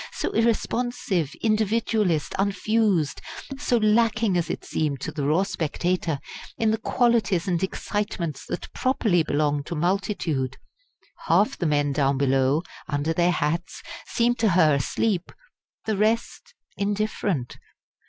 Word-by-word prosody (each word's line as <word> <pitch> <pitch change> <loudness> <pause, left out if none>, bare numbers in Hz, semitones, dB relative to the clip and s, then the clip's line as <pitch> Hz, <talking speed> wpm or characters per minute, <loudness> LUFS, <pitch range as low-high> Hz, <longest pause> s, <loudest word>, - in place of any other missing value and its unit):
so - - -3
irresponsive, 225 - 0
individualist, 215 -6 +1
unfused 200 -4 +1 0.4
so 250 -4 +2
lacking, 215 -2 +2
as 175 -2 0
it - - -4
seemed 145 -3 -1
to 160 - -4
the 150 -2 -4
raw 155 +7 +3
spectator, 170 -3 -1 0.4
in 220 -1 +2
the 220 - 0
qualities 220 -8 +1
and 175 -2 0
excitements 190 -5 -3
that - - -5
properly 220 -9 +2
belong 145 -1 0
to 170 - -5
multitude! 170 - -1 0.7
Half 190 +6 +3
the 175 - +1
men 145 -1 +1
down 135 -1 +1
below, 135 +3 +2 0.2
under 150 +2 -1
their 175 +1 +2
hats, 165 +2 -2 0.2
seemed 240 0 +1
to 225 - +3
her 155 -4 +5
asleep; 175 - 0 0.5
the 220 - 0
rest 225 - -1 0.2
indifferent. 200 - -2
180 Hz, 125 wpm, -25 LUFS, 150-215 Hz, 0.7 s, her